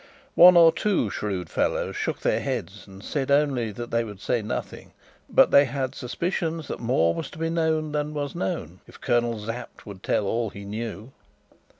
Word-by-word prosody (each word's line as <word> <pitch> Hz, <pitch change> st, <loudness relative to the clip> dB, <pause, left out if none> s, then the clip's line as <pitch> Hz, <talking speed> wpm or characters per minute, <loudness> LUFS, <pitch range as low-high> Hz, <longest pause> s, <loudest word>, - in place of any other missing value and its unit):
One 180 Hz, 0 st, +8 dB
or 165 Hz, -1 st, +8 dB
two 185 Hz, -, 0 dB
shrewd 95 Hz, -5 st, -3 dB
fellows -, -, -1 dB
shook -, -, -3 dB
their -, -, +1 dB
heads 95 Hz, +6 st, -5 dB
and 95 Hz, +1 st, -13 dB
said 140 Hz, +1 st, -3 dB
only 140 Hz, -6 st, +2 dB
that 120 Hz, +3 st, -7 dB
they 115 Hz, 0 st, +1 dB
would 105 Hz, -4 st, -9 dB
say 120 Hz, +3 st, 0 dB
nothing, 105 Hz, -, -6 dB, 0.4 s
but -, -, +5 dB
they 140 Hz, -, +7 dB
had 130 Hz, 0 st, -3 dB
suspicions 165 Hz, +4 st, -3 dB
that -, -, -4 dB
more 85 Hz, -9 st, +2 dB
was 155 Hz, -, -5 dB
to -, -, -13 dB
be 165 Hz, 0 st, -2 dB
known 160 Hz, -2 st, 0 dB
than 150 Hz, 0 st, -2 dB
was 145 Hz, -1 st, -3 dB
known, 90 Hz, -2 st, -4 dB
if -, -, -15 dB
Colonel 120 Hz, -1 st, +1 dB
Sapt 115 Hz, +2 st, -7 dB
would 100 Hz, -3 st, -10 dB
tell 105 Hz, -, 0 dB
all 115 Hz, +2 st, -1 dB
he 100 Hz, 0 st, -10 dB
knew. 110 Hz, +2 st, -6 dB
120 Hz, 190 wpm, -25 LUFS, 105-150 Hz, 0.4 s, One